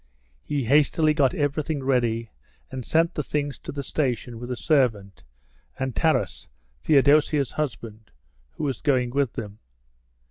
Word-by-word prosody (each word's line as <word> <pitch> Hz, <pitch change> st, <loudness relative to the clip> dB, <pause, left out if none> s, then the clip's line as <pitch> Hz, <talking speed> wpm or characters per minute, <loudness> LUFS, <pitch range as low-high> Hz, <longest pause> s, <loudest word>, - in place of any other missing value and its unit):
He 145 Hz, -, -2 dB
hastily 150 Hz, +4 st, +3 dB
got 140 Hz, -4 st, +2 dB
everything 145 Hz, 0 st, -1 dB
ready, 120 Hz, -4 st, 0 dB, 0.4 s
and 130 Hz, -1 st, -5 dB
sent 165 Hz, +6 st, +2 dB
the -, -, -2 dB
things 145 Hz, -1 st, -3 dB
to -, -, -7 dB
the 140 Hz, -1 st, -5 dB
station 125 Hz, -5 st, -2 dB
with 120 Hz, +1 st, -7 dB
a 125 Hz, -, -2 dB
servant 115 Hz, -, 0 dB, 0.5 s
and 130 Hz, -2 st, -3 dB
Taras, -, -, 0 dB, 0.3 s
Theodosia's 145 Hz, -1 st, +3 dB
husband, 110 Hz, -6 st, -5 dB, 0.4 s
who -, -, -6 dB
was 135 Hz, -5 st, -2 dB
going 125 Hz, -4 st, +1 dB
with 135 Hz, -2 st, 0 dB
them. 105 Hz, -4 st, -7 dB
135 Hz, 140 wpm, -25 LUFS, 120-145 Hz, 0.5 s, hastily